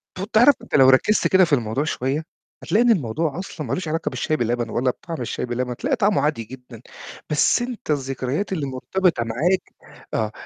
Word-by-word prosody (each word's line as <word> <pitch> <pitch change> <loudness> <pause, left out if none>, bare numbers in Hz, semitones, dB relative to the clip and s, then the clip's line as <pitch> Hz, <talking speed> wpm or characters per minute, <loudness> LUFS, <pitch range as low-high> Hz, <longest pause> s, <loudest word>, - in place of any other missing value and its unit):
طَب 195 +4 -6
تعرف 245 +5 +6
أنت - - -4
لو 135 -2 +7
ركّزت 135 +11 +4
كده 190 -1 +5
في 160 - -2
الموضوع 120 +1 0
شوية 145 0 -2 0.4
هتلاقي 220 +4 +2
إن 240 - +5
الموضوع 160 - -1
أصلًا 160 -6 -6
ما - - -2
لوش 180 -3 -3
علاقة 160 +2 -1
بالشاي 155 -2 -1
باللبن 120 0 -1
ولا 125 +3 0
بطعم 165 0 -8
الشاي 120 - -3
بلبن، 125 +1 -3
هتلاقي 270 - -1
طعمه 210 -3 +2
عادي 150 -6 0
جدًا، 125 0 -12 0.5
بس 150 +10 +3
أنت 240 -9 -4
الذكريات 135 +6 -2
اللي 155 -6 -2
مرتبطة 140 +2 0
معاك 155 +12 -1 0.4
آه، 110 -1 -1
150 Hz, 190 wpm, -22 LUFS, 125-185 Hz, 0.5 s, لو